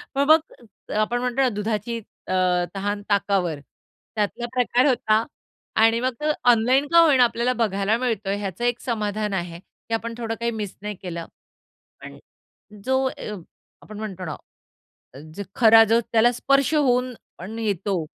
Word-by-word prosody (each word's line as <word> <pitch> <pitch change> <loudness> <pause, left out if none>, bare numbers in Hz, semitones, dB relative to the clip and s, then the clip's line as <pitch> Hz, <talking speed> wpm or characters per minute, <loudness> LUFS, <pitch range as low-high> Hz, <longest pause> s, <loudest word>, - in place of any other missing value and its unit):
पण 275 - +3
मग 315 +1 +7 0.6
आपण 240 +3 0
म्हणतो 250 +1 0
ना, 260 - +3
दुधाची 215 +1 -3 0.3
अ, - - -2 0.4
तहान, 205 +1 -2
ताकावर. 195 -6 +1 0.6
त्यातला 215 +3 -2
प्रकार 250 +1 +2
होता. 220 -4 +2 0.5
आणि 225 +1 +4
मग 255 0 0
तो - - -2 0.3
ऑनलाईन 250 +5 +2
का 335 - +8
होई 315 -5 +6
ना, 250 - +6
आपल्याला 240 +1 +1
बघायला 210 -2 0
मिळतोय. 220 -5 -1
ह्याचं 200 +1 -5
एक 245 0 0
समाधान 215 -3 -2
आहे 175 -2 -4
की 215 +4 -12
आपण 230 +1 -2
थोडं 225 -1 -3
काही 235 0 -1
मिस 210 -4 -5
नाही 210 0 -5
केलं. 170 -2 -6 0.8
पण - - -10 0.7
जो 265 0 +1
अ, 215 - -7 0.5
आपण 215 -1 -10
म्हणतो 195 -4 -6
ना 155 -3 -5 1.0
जो 200 - -5
खरा 225 -2 +7
जो 225 +2 +3
त्याला 230 +1 +4
स्पर्श 275 +4 +1
होऊन 255 -3 +2 0.2
पण 210 +6 -8
येतो 200 -5 -1
225 Hz, 155 wpm, -23 LUFS, 205-245 Hz, 1.0 s, का